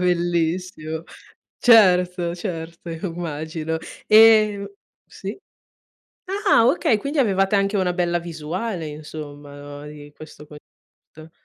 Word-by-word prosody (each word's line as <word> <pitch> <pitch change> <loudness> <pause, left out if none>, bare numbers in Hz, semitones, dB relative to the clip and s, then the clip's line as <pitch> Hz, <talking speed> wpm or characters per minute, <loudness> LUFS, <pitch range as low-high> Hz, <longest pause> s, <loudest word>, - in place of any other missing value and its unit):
Bellissimo. 170 -2 -1 0.6
Certo, 180 -6 +4
certo 170 -2 -6
immagino. 160 -2 -4 0.3
Ehm 215 -2 +6 0.4
Sì? 200 +2 -7 0.9
Ah, 390 - +3
okay, 250 -5 +2
quindi 280 +7 -3
avevate 195 -4 +2
anche 195 +1 +1
una 180 -2 0
bella 175 -1 0
visuale 170 +3 -5
insomma 150 -1 -9
no, 145 0 -10
di 145 -1 -11
questo 155 -1 -12
concerto. 155 +1 -17
175 Hz, 100 wpm, -22 LUFS, 155-200 Hz, 0.9 s, Ehm